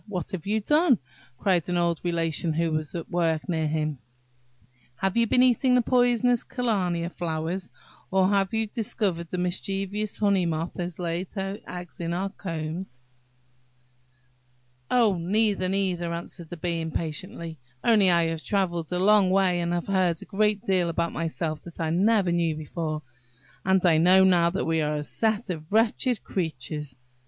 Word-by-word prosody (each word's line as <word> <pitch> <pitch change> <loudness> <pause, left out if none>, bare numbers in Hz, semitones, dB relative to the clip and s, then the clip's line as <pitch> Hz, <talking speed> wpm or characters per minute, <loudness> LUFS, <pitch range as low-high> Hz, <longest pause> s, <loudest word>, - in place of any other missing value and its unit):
what 190 -2 -4
have 190 -2 -5
you 215 +2 +1
done?" 295 - +3 0.4
cried 180 +1 +1
an 175 - +1
old 170 -1 +1
Relation 165 -1 0
who 165 +1 0
was 155 0 -2
at 170 - -4
work 165 -3 0
near 160 -4 0
him; 155 -2 -1 1.0
"have 190 +7 -1
you 235 0 +3
been 250 +3 +4
eating 255 +1 +4
the 250 - +5
poisonous 245 -1 +3
kalmia 185 -9 -1
flowers, 175 +2 -3 0.4
or 190 0 +3
have 195 -1 +2
you 225 0 +1
discovered 205 -6 -2
that - - -27
the 180 - -3
mischievous 195 +3 -2
honey 200 -3 +2
moth 165 0 -2
has 175 -1 -4
laid 175 +1 -3
her 195 0 -4
eggs 180 -1 -8
in 170 0 -2
our 195 +2 -1
combs?" 165 -6 -5 1.9
"Oh, 220 -7 +3
neither, 195 +1 +1
neither!" 185 -3 -1
answered 170 0 -7
the 175 - -7
Bee, 170 0 -2
impatiently; 160 0 -5 0.2
"only 210 -5 +5
I 170 -1 +4
have 165 -1 -4
travelled 175 -5 -1
a 180 - 0
long 200 0 +5
way, 185 -2 +3
and 170 0 -1
have 175 -1 -1
heard 185 -4 +1
a - - -10
great 210 0 +1
deal 185 -3 +1
about 170 0 -1
myself 160 -1 -3
that 170 - -11
I 160 -1 0
never 195 +1 +3
knew 170 -2 +1
before, 155 0 -4 0.6
and 190 0 +2
I 165 -3 +5
know 185 +3 +6
now 175 -3 +5
that 190 +3 -2
we 160 -1 +1
are 150 0 0
a 150 - -2
set 220 +4 -1
of 155 0 -7
wretched 225 +2 +2
creatures!" 150 -5 -4
180 Hz, 170 wpm, -26 LUFS, 165-200 Hz, 1.9 s, know